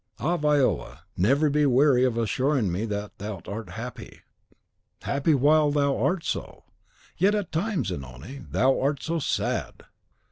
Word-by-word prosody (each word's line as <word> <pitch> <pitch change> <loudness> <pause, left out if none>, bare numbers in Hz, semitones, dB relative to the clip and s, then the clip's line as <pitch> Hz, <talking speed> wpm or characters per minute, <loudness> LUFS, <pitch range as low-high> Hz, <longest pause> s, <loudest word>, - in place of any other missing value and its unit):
Ah, 175 +3 0
Viola, 145 - +1
never 135 - +3
be 150 +1 +2
weary 130 0 +4
of 125 -3 +1
assuring 125 -1 +1
me 95 +6 -2
that 105 -1 -4
thou 105 -2 -5
art 105 -1 -6
happy!" 115 +7 -8 0.8
"Happy 140 +2 +1
while 150 +3 +4
thou 140 -1 +1
art 180 -2 0
so. - - -4 0.5
Yet 200 +4 +3
at 205 -5 -3
times, 170 - -1
Zanoni, 70 - -7
thou 135 +1 +2
art 140 +1 0
so 165 +1 -1
sad!" 140 - -2
135 Hz, 145 wpm, -26 LUFS, 110-150 Hz, 0.8 s, weary